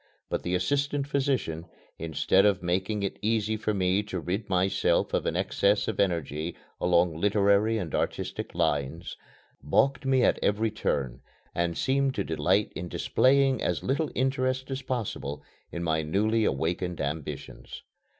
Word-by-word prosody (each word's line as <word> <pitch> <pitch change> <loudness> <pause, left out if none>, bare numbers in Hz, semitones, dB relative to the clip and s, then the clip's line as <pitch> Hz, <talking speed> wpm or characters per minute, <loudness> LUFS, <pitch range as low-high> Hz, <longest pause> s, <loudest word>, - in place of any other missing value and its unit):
But - - 0
the 90 +1 -1
assistant 140 +9 0
physician, 130 - -1 0.3
instead 80 +4 +2
of 100 -3 +2
making 95 +4 -1
it 100 - -3
easy 110 0 +1
for 110 0 -1
me 95 -1 +1
to 105 -3 -5
rid 95 +5 -3
myself 95 +1 +1
of - - 0
an - - -1
excess 100 +1 +1
of - - -3
energy 85 -3 -1 0.2
along 90 -2 +3
literary 105 +2 +3
and 85 -8 -4
artistic - - -3
lines, 75 +4 -1 0.5
balked 135 - +2
me 135 -1 +3
at - - +3
every 110 +2 +1
turn, 65 - -2 0.3
and 85 -1 -1
seemed 135 0 +1
to 100 - 0
delight 90 +6 +1
in 90 - -4
displaying 135 +5 +3
as - - -1
little 145 +4 0
interest 130 0 0
as 135 +1 -3
possible 110 - -4 0.3
in 85 - -4
my 80 -1 +1
newly 105 +8 +1
awakened 85 +5 -1
ambitions. 75 +1 -5
100 Hz, 150 wpm, -28 LUFS, 85-120 Hz, 0.5 s, along